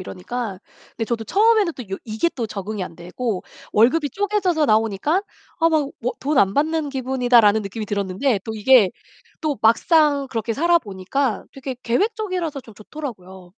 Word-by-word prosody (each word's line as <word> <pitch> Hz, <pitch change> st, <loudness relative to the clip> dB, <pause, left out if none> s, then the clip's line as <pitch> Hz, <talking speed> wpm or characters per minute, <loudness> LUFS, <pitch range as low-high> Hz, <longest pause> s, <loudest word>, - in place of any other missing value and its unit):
이러니까. 195 Hz, +2 st, -5 dB, 0.4 s
근데 225 Hz, -, -1 dB
저도 225 Hz, -1 st, -3 dB
처음에는 420 Hz, -, +3 dB
또 250 Hz, -, -7 dB
요 -, -, -1 dB
이게 220 Hz, +9 st, 0 dB
또 235 Hz, -4 st, -2 dB
적응이 205 Hz, -1 st, -5 dB
안 175 Hz, -2 st, -7 dB
되고 190 Hz, +3 st, -4 dB, 0.3 s
월급이 285 Hz, +8 st, +3 dB
쪼개져서 390 Hz, -, +1 dB
나오니까 225 Hz, -, +2 dB, 0.4 s
'아 330 Hz, -, +5 dB
막 300 Hz, -3 st, +1 dB
뭐 250 Hz, +2 st, -1 dB
돈 285 Hz, 0 st, 0 dB
안 195 Hz, -3 st, +4 dB
받는 310 Hz, 0 st, +1 dB
기분이다.'라는 245 Hz, -5 st, +3 dB
느낌이 210 Hz, +2 st, -5 dB
들었는데 200 Hz, +3 st, 0 dB
또 220 Hz, -, -4 dB
이게 215 Hz, -3 st, +5 dB, 0.5 s
또 300 Hz, -3 st, -1 dB
막상 285 Hz, +5 st, +3 dB
그렇게 225 Hz, -1 st, -2 dB
살아 340 Hz, +3 st, +4 dB
보니까 210 Hz, -, -2 dB
되게 265 Hz, -2 st, -6 dB
계획적이라서 365 Hz, -, -1 dB
좀 225 Hz, -, -15 dB
좋더라고요. 190 Hz, -8 st, -9 dB
245 Hz, 365 characters per minute, -21 LUFS, 210-305 Hz, 0.5 s, 아